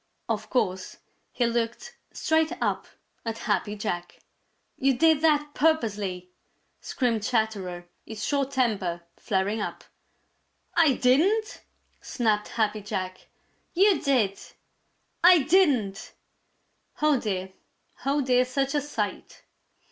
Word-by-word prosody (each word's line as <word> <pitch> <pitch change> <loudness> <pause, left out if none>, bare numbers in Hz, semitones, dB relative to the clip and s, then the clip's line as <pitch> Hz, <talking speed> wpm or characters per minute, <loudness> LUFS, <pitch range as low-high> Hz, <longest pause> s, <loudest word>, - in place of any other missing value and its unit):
Of - - -3
course, 190 -7 -1 0.3
he 245 - 0
looked 235 0 -2 0.2
straight 320 0 +1
up - - -1 0.4
at 225 -1 -4
Happy 210 -2 -1
Jack. 175 -4 -4 0.6
"You 270 -1 +3
did 320 0 +4
that 295 -2 +2
purposely!" 205 - 0 0.5
screamed 235 -4 -1
Chatterer, 200 -6 -2 0.2
his 220 -1 -6
short 280 -2 0
temper 205 -10 -1
flaring 205 +1 -1
up. - - -5 0.9
"I 330 -5 +4
didn't!" 365 - +2 0.4
snapped 215 -4 0
Happy 215 -2 -1
Jack. 185 -3 -5 0.5
"You 390 +1 +4
did!" 230 -8 +1 0.8
"I 350 -4 +7
didn't!" 270 - +2 0.9
Oh, 300 -3 +3
dear, 190 -4 -3 0.5
oh, 280 +2 +1
dear, 255 -1 +3
such 270 +2 -1
a 295 - +1
sight! 225 -8 -5
235 Hz, 110 wpm, -26 LUFS, 205-290 Hz, 0.9 s, I